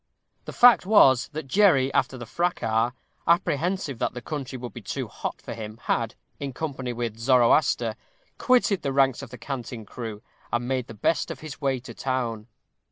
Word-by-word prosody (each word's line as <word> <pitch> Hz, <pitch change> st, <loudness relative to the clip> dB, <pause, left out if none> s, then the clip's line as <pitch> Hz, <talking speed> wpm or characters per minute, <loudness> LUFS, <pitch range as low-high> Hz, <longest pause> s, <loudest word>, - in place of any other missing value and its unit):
The -, -, -6 dB
fact 245 Hz, -1 st, +7 dB
was, 135 Hz, -, +6 dB
that 155 Hz, -1 st, -6 dB
Jerry, 140 Hz, -6 st, +4 dB
after 130 Hz, 0 st, +1 dB
the 120 Hz, -, -7 dB
fracas, 115 Hz, -7 st, 0 dB, 0.4 s
apprehensive 170 Hz, -3 st, +1 dB
that -, -, -1 dB
the -, -, -4 dB
country 140 Hz, -2 st, -5 dB
would 120 Hz, -3 st, -7 dB
be -, -, -8 dB
too -, -, -4 dB
hot -, -, -5 dB
for -, -, -7 dB
him, 110 Hz, -1 st, -7 dB
had, 115 Hz, -2 st, -1 dB, 0.2 s
in 140 Hz, -2 st, -4 dB
company 135 Hz, -4 st, -4 dB
with 115 Hz, -2 st, -4 dB
Zoroaster, 120 Hz, -1 st, +3 dB, 0.4 s
quitted 240 Hz, -7 st, +3 dB
the 140 Hz, -2 st, -2 dB
ranks 135 Hz, -2 st, +3 dB
of 135 Hz, -, -9 dB
the 125 Hz, -, -10 dB
Canting 120 Hz, -2 st, -6 dB
Crew, 110 Hz, 0 st, -7 dB, 0.3 s
and 120 Hz, +1 st, -1 dB
made 130 Hz, -2 st, -1 dB
the 115 Hz, -, -10 dB
best 135 Hz, +9 st, 0 dB
of -, -, -7 dB
his 155 Hz, -2 st, -8 dB
way 135 Hz, -2 st, +1 dB
to 130 Hz, -, -10 dB
town. 120 Hz, -4 st, -2 dB
130 Hz, 180 wpm, -25 LUFS, 120-145 Hz, 0.4 s, fact